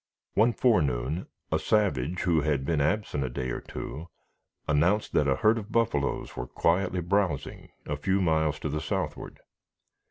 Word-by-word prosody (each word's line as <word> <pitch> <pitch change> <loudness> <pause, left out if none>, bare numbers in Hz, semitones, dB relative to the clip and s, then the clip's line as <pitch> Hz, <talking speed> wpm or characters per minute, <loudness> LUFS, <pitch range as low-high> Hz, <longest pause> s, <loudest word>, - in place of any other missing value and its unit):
One 115 +3 +4
forenoon, 75 - +1 0.2
a - - +2
savage, 90 - +1
who 85 -4 +2
had 70 -3 0
been 75 -1 +1
absent 75 -2 0
a 65 - -2
day 65 0 -3
or - - -4
two, 80 +4 -7 0.6
announced 85 +9 +2
that 75 - +3
a 65 - +3
herd 110 +10 +3
of 110 +1 -10
buffaloes 110 -12 0
were 60 - -4
quietly 90 +6 +1
browsing 90 -4 -1 0.2
a 75 - -3
few 95 +6 +1
miles 80 -4 +1
to 75 - -2
the 75 +2 -2
southward. - - -4
80 Hz, 160 wpm, -28 LUFS, 70-100 Hz, 0.6 s, One